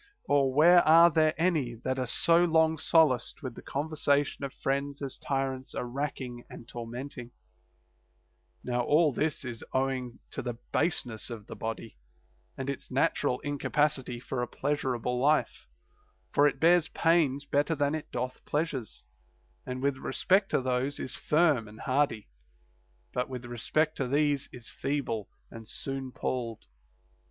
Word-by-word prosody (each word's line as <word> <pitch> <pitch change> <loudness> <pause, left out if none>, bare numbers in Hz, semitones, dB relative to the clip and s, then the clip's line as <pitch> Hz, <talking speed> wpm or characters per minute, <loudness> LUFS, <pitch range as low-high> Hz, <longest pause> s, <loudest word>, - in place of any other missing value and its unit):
Or 140 -2 +3
where 170 +6 +7
are 165 +2 +8
there 155 0 +3
any 155 -8 +1
that 130 +3 -3
are 130 - -1
so 170 +8 +4
long 160 -2 +3
solaced 150 -8 +3
with 130 -3 -4
the - - -10
conver 145 +3 -4
sation 145 -1 +1
of 140 - -3
friends 140 +1 -2
as 135 -2 -5
tyrants 135 -1 -3
are - - -2
racking 125 -2 -4
and 115 - -11
tormenting 120 +2 -7 1.4
1 125 - -4
Now 125 - +2
all 150 +3 +3
this 150 0 -1
is 120 -2 -6
owing 130 -2 -1
to - - -4
the 120 -2 -4 0.2
baseness 125 -10 -1
of 115 -4 -7
the - - -8
body 115 - -6 0.6
and 130 - -4
its 140 -1 -4
natural 125 - +1
incapacity 145 -3 0
for 125 0 -4
a 120 - -1
pleasurable 125 -4 -1
life; 150 +4 +1 0.6
for 145 - +5
it 140 - -2
bears 170 +1 +5
pains 155 -4 +2
better 145 +3 +1
than 145 0 +1
it 155 -1 -4
doth 125 0 -4
pleasures, 145 -7 -3 0.6
and 130 +1 -4
with 140 -1 +1
respect 190 +9 +1
to - - +1
those 130 +2 -1
is 130 - -5
firm 150 -8 +2
and 105 +1 -12
hardy, 130 -5 0 0.9
but 125 +1 -1
with 125 -2 -6
respect 155 +6 0
to 135 - -1
these 145 +1 +1
is 120 -3 -12
feeble 135 -6 -3 0.2
and 115 -1 -10
soon 135 -1 -5
palled. 115 -4 -3
135 Hz, 155 wpm, -29 LUFS, 125-150 Hz, 1.4 s, are